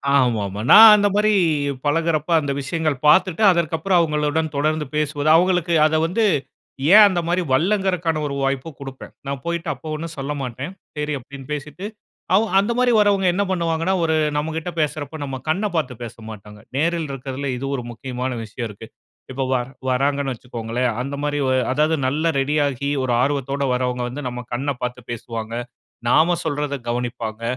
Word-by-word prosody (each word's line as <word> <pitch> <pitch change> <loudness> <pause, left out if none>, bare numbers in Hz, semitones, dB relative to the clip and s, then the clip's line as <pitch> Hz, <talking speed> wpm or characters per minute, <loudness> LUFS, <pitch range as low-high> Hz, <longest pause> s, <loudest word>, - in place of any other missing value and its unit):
ஆமா, 125 -5 +3
ஆமா. 100 +2 -6
நான் 220 0 +11
அந்த 205 -1 +3
மாரி 210 +1 +3 0.5
பழகுறப்ப, 155 +1 0
அந்த 145 -1 -2
விஷயங்கள் 155 +1 -1
பார்த்துட்டு 185 +5 +4
அதற்கு 170 -2 0
அப்புறம் 180 +2 +2
அவங்களுடன் 150 0 0
தொடர்ந்து 155 +2 0
பேசுவது 150 0 0
அவுங்களுக்கு 180 0 +2
அதை 155 0 +2
வந்து 205 +7 0 0.7
ஏன் 210 +1 +10
அந்த 180 -3 0
மாதிரி 175 +2 +1
வரலங்கிறதுக்கான 180 0 +1
ஒரு 140 - -4
வாய்ப்பும் 135 +2 -2
குடுப்பேன். 135 -1 -9
நான் 140 -1 -4
போய்ட்டு 170 0 -2
அப்ப - - -17
ஒண்ணும் 165 +1 -6
சொல்லமாட்டேன். 135 +1 -4 0.3
சரி 150 0 -2
அப்படீன்னு 135 +1 -11
பேசிட்டு. 150 +6 -6 0.5
அவு 210 - +4 0.2
அந்த 205 +4 0
மாதிரி 250 0 +3
வரவங்க 200 -2 +3
என்ன 200 +3 +1
பண்ணுவாங்கன்னா 170 0 0
ஒரு 160 -1 +2 0.2
நம்மகிட்ட 160 +3 -3
பேசுறப்ப 155 0 -2
நம்ம 135 -1 -5
கண்ணப் 200 +5 0
பார்த்து 145 -6 -1
பேசமாட்டாங்க. 110 -2 -10 0.2
நேரில் 165 +1 0
இருக்கிறதுல 135 +1 -5
இது 135 - -5
ஒரு 125 - -4
முக்கியமான 125 +2 -4
விஷயம் 115 +2 -5
இருக்கு. 105 +2 -11 0.4
இப்ப 135 +1 -2
வரா 125 0 -1 0.2
வராங்கன்னு 140 +1 0
வச்சுக்கோங்களேன். 120 0 -3
அந்த 140 +2 -4
மாதிரி 145 0 -1 0.3
அதாவது 155 +4 +2
நல்லா 155 +5 0
ரெடியாகி 140 -1 0
ஒரு 125 -2 0
ஆர்வத்தோட 140 0 -1
வரவங்க 125 0 -1
வந்து 145 +4 -6
நம்ம 125 0 -6
கண்ண 140 +4 -1
பாத்து 125 0 -4
பேசுவாங்க. 115 -1 -6 0.6
நாம 170 +6 +4
சொல்றதை 145 -2 -2
கவனிப்பாங்க. 120 -2 -4
145 Hz, 155 wpm, -21 LUFS, 130-165 Hz, 0.7 s, நான்